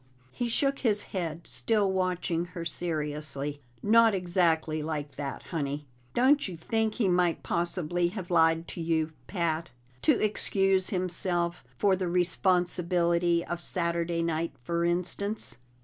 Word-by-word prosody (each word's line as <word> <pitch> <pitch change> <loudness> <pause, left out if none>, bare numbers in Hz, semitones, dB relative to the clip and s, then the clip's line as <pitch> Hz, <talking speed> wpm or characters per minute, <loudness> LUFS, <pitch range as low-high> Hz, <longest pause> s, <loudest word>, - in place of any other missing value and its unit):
He 240 - -2
shook 275 +3 +1
his 210 -5 +1
head, 170 -3 -3
still 210 -4 +1
watching 180 -2 0
her 170 -1 -4
seriously. 150 -4 -3 0.2
"Not 225 0 +5
exactly 170 -4 +1
like 150 -2 -3
that, 140 -1 -5
Honey. 145 -2 -3 0.3
Don't 280 +2 +4
you 180 -3 -7
think 220 +6 -1
he 225 -6 +1
might 180 -2 +2
possibly 175 0 0
have 185 -1 -6
lied 165 0 +3
to 170 - -5
you, 160 -1 0 0.2
Pat? 170 -3 -1 0.3
To - - +3
excuse 195 -2 +1
himself 175 -2 +1
for 200 -2 +3
the 185 -1 -2
responsibility 175 -1 +2
of 175 - -4
Saturday 170 -1 -1
night, 165 0 -1
for 170 +2 -1
instance?" 180 - -1
175 Hz, 135 wpm, -29 LUFS, 165-190 Hz, 0.3 s, Not